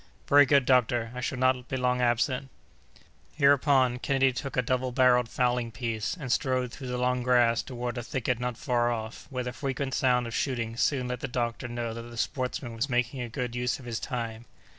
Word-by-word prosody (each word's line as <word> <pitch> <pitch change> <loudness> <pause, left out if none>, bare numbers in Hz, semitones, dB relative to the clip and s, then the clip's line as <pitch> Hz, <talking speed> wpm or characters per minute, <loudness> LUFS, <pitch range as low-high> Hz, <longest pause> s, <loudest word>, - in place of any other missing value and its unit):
"Very 145 0 +7
good, 140 -1 +4
doctor, 120 -3 +2
I 125 - -5
shall 130 +2 -2
not 130 0 +1
be 130 - -2
long 125 0 +1
absent." 125 +3 +1 0.9
Hereupon, 140 -3 +4
Kennedy 135 -1 +2
took 135 +1 -5
a 125 - +3
double 130 +1 0
barrelled 125 -2 +4
fowling 125 -1 0
piece, 115 - -3
and 130 -5 -4
strode 130 -1 0
through 130 0 -8
the 125 0 -2
long 125 0 +1
grass 120 -2 +3
toward 125 -1 -4
a - - -3
thicket 125 -1 -2
not 125 -1 -3
far 120 -4 +1
off, 110 -1 -5
where 125 -2 -3
the 125 0 -4
frequent 135 -1 -3
sound 125 -2 +2
of 115 - -6
shooting 115 -4 -2
soon 125 +1 +1
let 125 -1 -3
the 135 - -3
doctor 120 -1 -2
know 120 -1 -4
that 115 - -6
the 120 0 -10
sportsman 125 -1 -3
was 115 +5 -1
making 125 +1 0
a 120 - -4
good 125 -1 -4
use 125 0 -1
of 130 - -13
his 120 -1 -3
time. 115 -2 -4
125 Hz, 205 wpm, -28 LUFS, 120-130 Hz, 0.9 s, Very